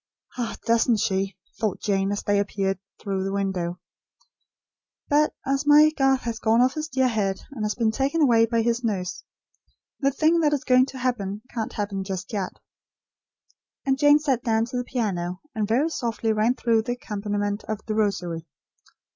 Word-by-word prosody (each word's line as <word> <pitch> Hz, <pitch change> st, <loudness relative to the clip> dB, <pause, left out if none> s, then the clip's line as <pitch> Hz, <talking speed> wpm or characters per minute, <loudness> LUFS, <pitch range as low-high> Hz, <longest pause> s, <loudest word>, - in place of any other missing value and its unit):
"Ah, 240 Hz, -3 st, -3 dB
doesn't 230 Hz, 0 st, +3 dB
she?" 195 Hz, -2 st, -1 dB, 0.2 s
thought 210 Hz, -4 st, -1 dB
Jane, 195 Hz, -1 st, 0 dB
as 205 Hz, -, -2 dB
they 205 Hz, -, +1 dB
disappeared 195 Hz, -1 st, -2 dB, 0.2 s
through 195 Hz, -2 st, -2 dB
the 195 Hz, -, -2 dB
window. 190 Hz, -3 st, -2 dB, 1.3 s
"But 300 Hz, +1 st, +3 dB
as 275 Hz, +2 st, 0 dB
my 300 Hz, +1 st, +7 dB
Garth 270 Hz, -3 st, +2 dB
has 235 Hz, -1 st, -4 dB
gone 225 Hz, +1 st, +3 dB
off 255 Hz, +2 st, +4 dB
his 310 Hz, 0 st, -3 dB
dear 265 Hz, -3 st, +1 dB
head, 200 Hz, -5 st, -1 dB
and 240 Hz, -6 st, -5 dB
been 225 Hz, -2 st, +2 dB
taken 275 Hz, +7 st, 0 dB
away 230 Hz, -6 st, +5 dB
by 230 Hz, 0 st, +1 dB
his 235 Hz, +1 st, 0 dB
nurse, 185 Hz, -5 st, -2 dB, 0.8 s
the 275 Hz, -, +3 dB
thing 315 Hz, +5 st, +2 dB
that 300 Hz, -2 st, +3 dB
is 285 Hz, -, -1 dB
going 255 Hz, +1 st, +4 dB
to 270 Hz, -, -8 dB
happen, 215 Hz, -5 st, -2 dB
can't 225 Hz, -3 st, -3 dB
happen 200 Hz, -2 st, -3 dB
just 190 Hz, +2 st, -5 dB
yet." 195 Hz, -3 st, -2 dB, 1.3 s
And 270 Hz, 0 st, +1 dB
Jane 290 Hz, +1 st, +7 dB
sat 275 Hz, -5 st, 0 dB
down 225 Hz, -1 st, +2 dB
to 245 Hz, +1 st, -5 dB
the 245 Hz, -, -1 dB
piano, 185 Hz, -8 st, -2 dB
and 215 Hz, -2 st, -1 dB
very 260 Hz, +9 st, +2 dB
softly 230 Hz, -6 st, -1 dB
ran 220 Hz, +4 st, +2 dB
through 230 Hz, -3 st, +2 dB
the 240 Hz, +2 st, -2 dB
accompaniment 205 Hz, -2 st, -3 dB
of 215 Hz, -1 st, -5 dB
The 215 Hz, -, -2 dB
Rosary. 180 Hz, -6 st, -1 dB
225 Hz, 175 wpm, -25 LUFS, 200-260 Hz, 1.3 s, my